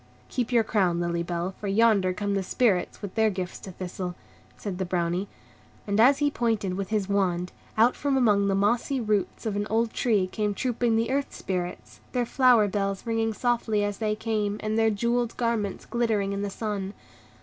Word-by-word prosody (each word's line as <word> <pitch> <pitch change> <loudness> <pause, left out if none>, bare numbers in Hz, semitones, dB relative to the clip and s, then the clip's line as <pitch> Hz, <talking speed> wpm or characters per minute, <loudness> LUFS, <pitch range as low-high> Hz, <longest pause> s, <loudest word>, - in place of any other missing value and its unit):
"Keep 250 -1 -2
your 235 -2 +4
crown, 185 -6 +1
Lily 170 0 -1
Bell, 175 +2 -3
for 205 - -4
yonder 200 -2 +4
come 200 +2 -2
the 195 - +1
Spirits 190 -1 0
with 200 - -5
their 220 -1 +3
gifts 185 -2 -4
to 190 - -9
Thistle," 180 0 -5 0.4
said 195 -3 -5
the - - +1
Brownie. 175 +1 -1 0.6
And, 200 0 0
as 265 +5 +6
he 290 0 +1
pointed 225 -7 0
with 195 0 -3
his 210 -3 0
wand, 180 -3 0 0.3
out 230 +3 +5
from 280 -1 0
among 205 -5 +3
the 195 - +2
mossy 235 +7 +1
roots 210 -2 -1
of 215 -2 -1
an 205 +1 -1
old 225 +1 +1
tree 215 -6 +2
came 205 +2 -2
trooping 240 0 0
the 230 +2 +1
Earth 280 +1 0
Spirits, 180 -2 -4
their 245 -1 +1
flower 245 -4 +4
bells 195 0 -2
ringing 225 -1 0
softly 225 -2 0
as 205 -1 -2
they 215 -1 0
came, 215 -2 -1
and 215 0 -1
their 225 0 +4
jewelled 235 +2 0
garments 230 -5 -1
glittering 220 -4 0
in 200 - -2
the 205 - -2
sun. 200 -1 -4
210 Hz, 195 wpm, -26 LUFS, 195-230 Hz, 0.6 s, as